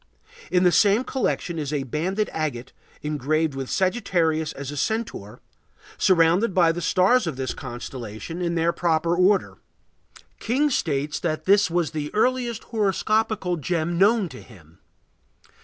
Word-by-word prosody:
In 180 Hz, 0 st, +3 dB
the 180 Hz, -, +5 dB
same 205 Hz, +6 st, +4 dB
collection 210 Hz, -10 st, -2 dB
is 145 Hz, -2 st, -3 dB
a 145 Hz, -2 st, -1 dB
banded 180 Hz, -, -2 dB
agate 135 Hz, -6 st, -4 dB, 0.3 s
engraved 150 Hz, +1 st, 0 dB
with 135 Hz, -1 st, -5 dB
Sagittarius 175 Hz, -6 st, 0 dB
as 140 Hz, 0 st, -7 dB
a -, -, -7 dB
centaur, 145 Hz, -, -3 dB, 0.6 s
surrounded 180 Hz, +3 st, +3 dB
by 170 Hz, -3 st, +5 dB
the 175 Hz, +1 st, -5 dB
stars 185 Hz, +6 st, +3 dB
of 160 Hz, -, -3 dB
this 130 Hz, -1 st, -3 dB
constellation 120 Hz, -, -7 dB
in 170 Hz, -1 st, -1 dB
their 170 Hz, +1 st, +1 dB
proper 165 Hz, 0 st, +1 dB
order. 185 Hz, +2 st, +2 dB, 0.8 s
King 280 Hz, +6 st, +1 dB
states 150 Hz, -, -1 dB
that 155 Hz, -2 st, -3 dB
this 200 Hz, 0 st, +4 dB
was 170 Hz, -1 st, 0 dB
the 150 Hz, -2 st, -4 dB
earliest 240 Hz, 0 st, 0 dB
horoscopical 215 Hz, -3 st, 0 dB
gem 170 Hz, +2 st, -1 dB
known 205 Hz, 0 st, +4 dB
to 130 Hz, -, -11 dB
him. 85 Hz, -7 st, -18 dB
170 Hz, 140 wpm, -24 LUFS, 150-200 Hz, 0.8 s, the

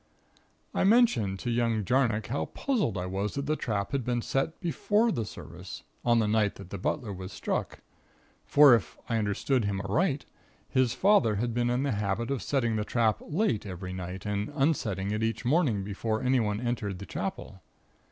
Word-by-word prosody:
"I -, -, +1 dB
mentioned 190 Hz, -, +4 dB
to 120 Hz, -, -2 dB
young 115 Hz, -3 st, +1 dB
Jarnock 120 Hz, -3 st, +2 dB
how 135 Hz, +5 st, -2 dB
puzzled 220 Hz, -, -1 dB
I 90 Hz, -, -2 dB
was 95 Hz, +3 st, -2 dB
that 140 Hz, 0 st, -2 dB
the 155 Hz, +1 st, +1 dB
trap 105 Hz, -8 st, -2 dB
had 140 Hz, -3 st, -1 dB
been 120 Hz, 0 st, -1 dB
set 135 Hz, +4 st, -1 dB
before 205 Hz, -, +1 dB
the 115 Hz, -, -2 dB
service, -, -, -9 dB, 0.2 s
on 120 Hz, -1 st, +4 dB
the 110 Hz, -2 st, +2 dB
night 105 Hz, -1 st, +2 dB
that 90 Hz, -, -11 dB
the 100 Hz, -, -5 dB
butler 105 Hz, +2 st, -2 dB
was 95 Hz, 0 st, -7 dB
struck; -, -, -3 dB, 0.6 s
for, 145 Hz, -3 st, +7 dB
if 115 Hz, -, +1 dB
I 115 Hz, -, 0 dB
understood 110 Hz, +4 st, 0 dB
him 100 Hz, -1 st, -1 dB
aright, 135 Hz, -, 0 dB, 0.4 s
his 130 Hz, -3 st, +1 dB
father 185 Hz, -, +4 dB
had 120 Hz, +3 st, -1 dB
been 120 Hz, 0 st, +1 dB
in 125 Hz, +2 st, +1 dB
the 140 Hz, -, 0 dB
habit 105 Hz, +3 st, -1 dB
of 135 Hz, -, -1 dB
setting 120 Hz, -6 st, 0 dB
the 105 Hz, -, 0 dB
trap 110 Hz, -1 st, +1 dB
late 155 Hz, -, 0 dB
every 90 Hz, -2 st, -6 dB
night 90 Hz, 0 st, -6 dB
and 105 Hz, 0 st, -2 dB
unsetting 110 Hz, -, 0 dB
it 105 Hz, +1 st, -1 dB
each 115 Hz, +2 st, -1 dB
morning 125 Hz, -, +2 dB
before 110 Hz, +3 st, -2 dB
anyone 115 Hz, -5 st, +1 dB
entered 115 Hz, -5 st, -2 dB
the 100 Hz, -, -8 dB
Chapel. 110 Hz, -, -5 dB
115 Hz, 185 wpm, -29 LUFS, 100-135 Hz, 0.6 s, for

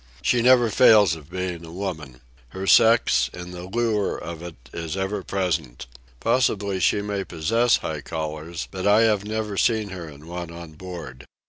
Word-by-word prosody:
She 125 Hz, -, +2 dB
never 120 Hz, -2 st, +5 dB
fails 105 Hz, -6 st, +6 dB
of 80 Hz, -2 st, -13 dB
being 90 Hz, -2 st, -4 dB
a 80 Hz, -, -10 dB
woman. 80 Hz, -9 st, -6 dB, 0.3 s
Her 95 Hz, +5 st, -6 dB
sex, 115 Hz, +4 st, +5 dB
and 90 Hz, 0 st, -8 dB
the 90 Hz, 0 st, -7 dB
lure 110 Hz, 0 st, 0 dB
of 85 Hz, -1 st, -7 dB
it, 85 Hz, -2 st, -8 dB, 0.2 s
is 85 Hz, +2 st, -4 dB
ever 95 Hz, +1 st, -2 dB
present. 85 Hz, -10 st, -2 dB, 0.3 s
Possibly 105 Hz, -5 st, +1 dB
she 100 Hz, +4 st, +2 dB
may 100 Hz, -1 st, -2 dB
possess 115 Hz, +9 st, +2 dB
high 75 Hz, -2 st, -5 dB
collars, 80 Hz, +2 st, -5 dB
but 95 Hz, +1 st, -3 dB
I 105 Hz, +2 st, +6 dB
have 105 Hz, -3 st, +2 dB
never 105 Hz, -1 st, -3 dB
seen 110 Hz, -2 st, +1 dB
her 90 Hz, -4 st, -7 dB
in 75 Hz, +1 st, -13 dB
one 85 Hz, 0 st, -6 dB
on 85 Hz, -1 st, -9 dB
board. 75 Hz, -7 st, -9 dB
95 Hz, 170 wpm, -24 LUFS, 80-105 Hz, 0.3 s, fails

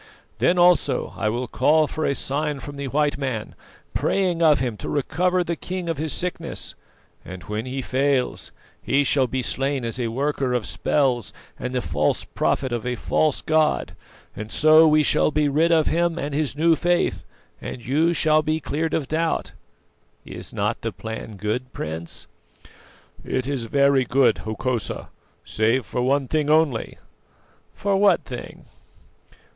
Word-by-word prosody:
Then 180 Hz, -, +3 dB
also 175 Hz, -2 st, +3 dB
I 110 Hz, -, 0 dB
will 120 Hz, +3 st, -2 dB
call 150 Hz, +8 st, +3 dB
for 155 Hz, +1 st, -3 dB
a 140 Hz, -, 0 dB
sign 145 Hz, +1 st, -1 dB
from 145 Hz, +1 st, -8 dB
the 140 Hz, 0 st, -4 dB
white 145 Hz, +2 st, 0 dB
man, 130 Hz, -6 st, -3 dB, 0.4 s
praying 180 Hz, -4 st, 0 dB
of 155 Hz, -3 st, +6 dB
him 120 Hz, -3 st, -2 dB
to -, -, -6 dB
recover 180 Hz, +6 st, +1 dB
the 170 Hz, 0 st, -2 dB
king 180 Hz, +1 st, -5 dB
of 165 Hz, -3 st, -2 dB
his 155 Hz, -1 st, -2 dB
sickness; 180 Hz, 0 st, -4 dB, 0.5 s
and 90 Hz, -2 st, -9 dB
when 105 Hz, +3 st, -4 dB
he 130 Hz, +1 st, -4 dB
fails, 135 Hz, 0 st, 0 dB, 0.3 s
he 140 Hz, +1 st, +2 dB
shall 135 Hz, -1 st, +2 dB
be 130 Hz, +1 st, -2 dB
slain 135 Hz, 0 st, -1 dB
as 115 Hz, +2 st, -3 dB
a 120 Hz, -, 0 dB
worker 135 Hz, +1 st, -1 dB
of 120 Hz, -, -1 dB
spells 130 Hz, -6 st, 0 dB, 0.3 s
and 125 Hz, 0 st, -4 dB
the 125 Hz, -, 0 dB
false 75 Hz, -2 st, 0 dB
prophet 130 Hz, -2 st, -1 dB
of 120 Hz, -2 st, -2 dB
a 125 Hz, 0 st, -2 dB
false 155 Hz, +3 st, 0 dB
god, 155 Hz, -1 st, +1 dB, 0.4 s
and 110 Hz, +1 st, -7 dB
so 155 Hz, +1 st, +6 dB
we 155 Hz, 0 st, +4 dB
shall -, -, +3 dB
be 150 Hz, -1 st, +1 dB
rid 155 Hz, +4 st, +2 dB
of 160 Hz, -2 st, +4 dB
him 170 Hz, 0 st, +1 dB
and 145 Hz, -2 st, -3 dB
his 145 Hz, -1 st, -1 dB
new 165 Hz, +1 st, +4 dB
faith, 175 Hz, +2 st, 0 dB, 0.4 s
and 120 Hz, -, -7 dB
you 155 Hz, +7 st, +2 dB
shall 155 Hz, -2 st, +3 dB
be 155 Hz, +1 st, -1 dB
cleared 160 Hz, +1 st, -2 dB
of 145 Hz, -4 st, -2 dB
doubt. 165 Hz, +1 st, -1 dB, 0.7 s
Is -, -, -7 dB
not -, -, -2 dB
the -, -, -2 dB
plan 110 Hz, -1 st, -7 dB
good, 115 Hz, +6 st, -3 dB
Prince?" 80 Hz, +2 st, -6 dB, 1.0 s
"It 130 Hz, -, -2 dB
is 135 Hz, -5 st, -2 dB
very 140 Hz, +1 st, +3 dB
good, 130 Hz, -4 st, +3 dB
Hokosa 115 Hz, +2 st, -3 dB, 0.4 s
save 115 Hz, +3 st, +1 dB
for 125 Hz, -, -3 dB
one 135 Hz, +2 st, +1 dB
thing 150 Hz, 0 st, 0 dB
only." 155 Hz, -7 st, +2 dB, 0.8 s
"For 200 Hz, -1 st, 0 dB
what 195 Hz, -3 st, +4 dB
thing?" 125 Hz, -, -8 dB
140 Hz, 165 wpm, -23 LUFS, 125-155 Hz, 1.0 s, of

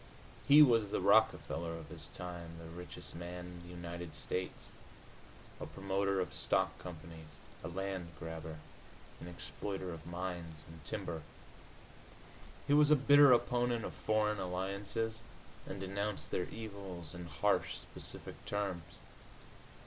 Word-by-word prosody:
He 150 Hz, +2 st, +11 dB
was 115 Hz, -6 st, +5 dB
the -, -, 0 dB
Rockefeller 90 Hz, -4 st, +3 dB
of 80 Hz, -3 st, -9 dB
his -, -, -5 dB
time, 85 Hz, -2 st, -6 dB
the 85 Hz, -, -9 dB
richest 85 Hz, +2 st, -7 dB
man 90 Hz, +1 st, -6 dB
in 90 Hz, -1 st, -9 dB
the 85 Hz, -, -11 dB
United 85 Hz, -1 st, -6 dB
States, 90 Hz, 0 st, -3 dB, 0.9 s
a -, -, -4 dB
promoter 100 Hz, 0 st, 0 dB
of 90 Hz, -, -1 dB
stock -, -, +2 dB
companies, 80 Hz, -2 st, -8 dB, 0.4 s
a -, -, -3 dB
land 95 Hz, 0 st, -3 dB
grabber, 80 Hz, -1 st, -6 dB, 0.6 s
an -, -, -8 dB
exploiter 95 Hz, +1 st, -4 dB
of 80 Hz, -1 st, -9 dB
mines 85 Hz, -3 st, -4 dB
and 80 Hz, -2 st, -12 dB
timber. 80 Hz, +1 st, -3 dB, 1.4 s
He 145 Hz, -, +3 dB
was 150 Hz, 0 st, +7 dB
a 150 Hz, -, +8 dB
bitter 145 Hz, 0 st, +8 dB
opponent 120 Hz, -1 st, +3 dB
of -, -, -4 dB
foreign 105 Hz, -1 st, +1 dB
alliances, 100 Hz, +5 st, -2 dB, 0.5 s
and 95 Hz, -, -5 dB
denounced 100 Hz, +2 st, -2 dB
their 90 Hz, -, +1 dB
evils 100 Hz, -7 st, -7 dB
in 90 Hz, -1 st, -6 dB
harsh, -, -, +1 dB
specific -, -, -9 dB
terms. 90 Hz, -5 st, -2 dB
90 Hz, 135 wpm, -35 LUFS, 85-105 Hz, 1.4 s, He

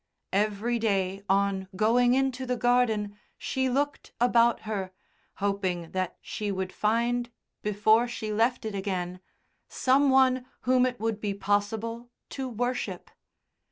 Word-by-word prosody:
Every 215 Hz, +4 st, +1 dB
day 195 Hz, -3 st, 0 dB
on 195 Hz, -1 st, +1 dB
going 240 Hz, +5 st, +4 dB
into 265 Hz, -1 st, 0 dB
the 250 Hz, 0 st, 0 dB
garden 220 Hz, -4 st, +1 dB, 0.2 s
she 260 Hz, 0 st, -1 dB
looked 285 Hz, +3 st, -2 dB
about 235 Hz, -1 st, +4 dB
her, 200 Hz, -4 st, -4 dB, 0.4 s
hoping 190 Hz, -4 st, -2 dB
that 185 Hz, -1 st, -2 dB
she 210 Hz, -1 st, -3 dB
would 190 Hz, -1 st, -3 dB
find 235 Hz, +3 st, 0 dB, 0.3 s
before 215 Hz, +3 st, +3 dB
she 220 Hz, -3 st, -4 dB
left 230 Hz, +2 st, +1 dB
it 215 Hz, -, -3 dB
again 185 Hz, -2 st, -3 dB, 0.5 s
some 270 Hz, +2 st, +3 dB
one 260 Hz, -1 st, +4 dB
whom 255 Hz, 0 st, +3 dB
it 250 Hz, -1 st, -5 dB
would 220 Hz, -1 st, -2 dB
be 205 Hz, -2 st, -2 dB
possible 220 Hz, +4 st, -1 dB, 0.2 s
to 265 Hz, -2 st, -4 dB
worship. 245 Hz, +2 st, -3 dB
220 Hz, 130 wpm, -28 LUFS, 200-245 Hz, 0.5 s, going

